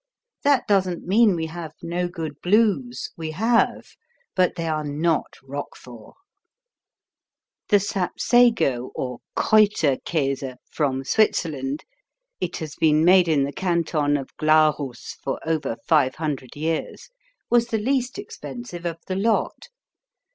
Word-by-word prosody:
That 280 -3 +3
doesn't 185 -4 +1
mean 210 +1 +4
we 165 -1 -2
have 160 -1 -7
no 175 +1 -1
good 160 -5 -6
Blues. 180 - +1
We 160 -1 -5
have. 225 +7 +1 0.4
But 185 -1 +2
they 170 -2 -3
are 155 -1 -1
not 150 +3 -1
Roquefort. 130 -4 -9 1.5
The 205 - +6
Sapsago 195 - +2
or 125 -2 -4 0.2
Kräuterkäse 145 -9 +2 0.2
from 135 -3 -1
Switzerland 145 -6 0 0.6
(it - - -3
has 155 -3 -6
been 155 0 +3
made 180 0 +6
in 150 -4 +3
the 140 +1 -3
Canton 165 -5 0
of 135 - -8
Glarus 155 -5 +1
for - - -2
over 155 -8 -1
five 145 -5 +3
hundred 140 -6 -4
years) 160 +2 -3 0.4
was 235 -1 +4
the 225 - -1
least 255 - -1
expensive 245 - -7
of 165 -1 -4
the 185 - -3
lot. 220 - 0
165 Hz, 125 wpm, -23 LUFS, 145-195 Hz, 1.5 s, The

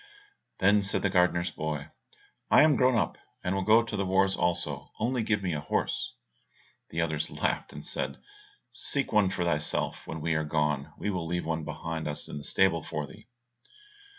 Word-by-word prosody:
Then 100 +2 +4
said 100 +1 +1
the 100 - +2
gardener's 90 -2 +3
boy, 75 -3 -4 0.6
"I - - +7
am 155 -2 +5
grown 130 -1 +4
up, - - 0 0.2
and 90 - 0
will 95 - 0
go 110 +4 +5
to 115 - -5
the 100 - 0
wars 95 +1 +3
also, 90 -1 -1
only 120 +2 +1
give 110 -2 0
me 90 -3 0
a 75 - -1
horse." 75 - -1 0.7
The 80 - -4
others 80 -2 -1
laughed, - - -1
and - - -8
said, - - -2 0.5
"Seek 140 -4 -2
one 105 -3 +5
for 90 -2 -1
thyself 75 -3 -1
when 80 - -5
we 80 +1 0
are 80 0 +1
gone, 75 -2 0
we 105 - -2
will 90 -4 -3
leave 90 0 -2
one 80 -1 -2
behind 80 +1 -4
us 75 - -2
in - - -6
the - - -9
stable 85 0 +3
for 75 0 -4
thee." - - -15
90 Hz, 190 wpm, -29 LUFS, 80-100 Hz, 0.7 s, I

